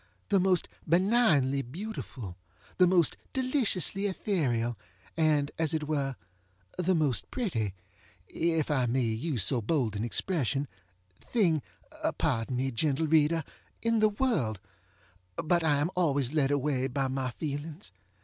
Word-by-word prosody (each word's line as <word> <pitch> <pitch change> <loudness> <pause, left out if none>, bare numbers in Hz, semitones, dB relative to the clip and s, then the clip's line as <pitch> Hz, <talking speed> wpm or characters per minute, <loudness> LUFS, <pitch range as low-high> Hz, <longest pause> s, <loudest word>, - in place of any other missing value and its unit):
the 200 - +4
most 185 -1 +2 0.2
benignly 170 - +3
beautiful, 135 - -7 0.4
the 180 - +7
most 175 -4 +3 0.2
deliciously 245 - +1
ethereal, 130 - 0 0.4
and, 150 -3 +2
as 160 0 +1
it 155 - -1
were, 140 -3 -1 0.6
the 185 +1 +1
most 150 -7 +1
pretty 115 - -2 0.5
(if 165 -2 0
I 130 -4 +2
may 125 +2 +1
use 115 - 0
so 125 +2 +3
bold 115 -3 0
an 105 - -2
expression) 140 - 0 0.5
thing 175 -10 +1 0.6
(pardon 115 +3 0
me, 130 +2 -1
gentle 145 +5 0
reader!) 160 +1 +3 0.4
in 230 -1 +2
the 215 0 +5
worldŌĆöbut 145 - -3
I 150 -3 +2
am 150 +5 0
always 145 -7 +1
led 145 -4 +2
away 140 -2 0
by 135 +1 -1
my 130 -1 -2
feelings. 150 - -6
150 Hz, 130 wpm, -29 LUFS, 130-180 Hz, 0.6 s, the